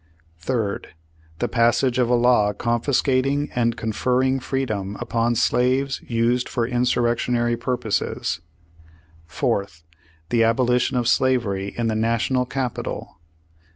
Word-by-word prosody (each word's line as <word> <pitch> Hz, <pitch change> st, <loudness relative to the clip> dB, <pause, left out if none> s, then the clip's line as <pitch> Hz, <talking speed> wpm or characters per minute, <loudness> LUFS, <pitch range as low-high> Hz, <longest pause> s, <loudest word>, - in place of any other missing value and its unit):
"Third. 105 Hz, -2 st, -3 dB, 0.4 s
The -, -, -1 dB
passage 120 Hz, +2 st, +2 dB
of 120 Hz, -2 st, +2 dB
a 125 Hz, -, +4 dB
law 120 Hz, -4 st, +3 dB
confiscating 130 Hz, +4 st, 0 dB
and 115 Hz, -2 st, 0 dB
con 110 Hz, -, -2 dB
ferring 130 Hz, +4 st, +1 dB
freedom 110 Hz, -8 st, -3 dB
upon 120 Hz, +1 st, 0 dB
slaves 130 Hz, +3 st, +1 dB
used 120 Hz, +1 st, +1 dB
for 120 Hz, -, -1 dB
insurrectionary 120 Hz, -1 st, +1 dB
pui* 125 Hz, +1 st, -2 dB
poses. 105 Hz, -6 st, -2 dB, 0.9 s
"Fourth. 85 Hz, +1 st, -2 dB, 0.5 s
The 115 Hz, -1 st, +3 dB
abolition 125 Hz, +2 st, +2 dB
of 120 Hz, -2 st, 0 dB
slavery 115 Hz, -7 st, +1 dB
in 120 Hz, -, -1 dB
the 110 Hz, -, +1 dB
National 115 Hz, +3 st, 0 dB
capi 130 Hz, -2 st, -2 dB
tal. -, -, -7 dB
120 Hz, 120 wpm, -22 LUFS, 115-125 Hz, 0.9 s, a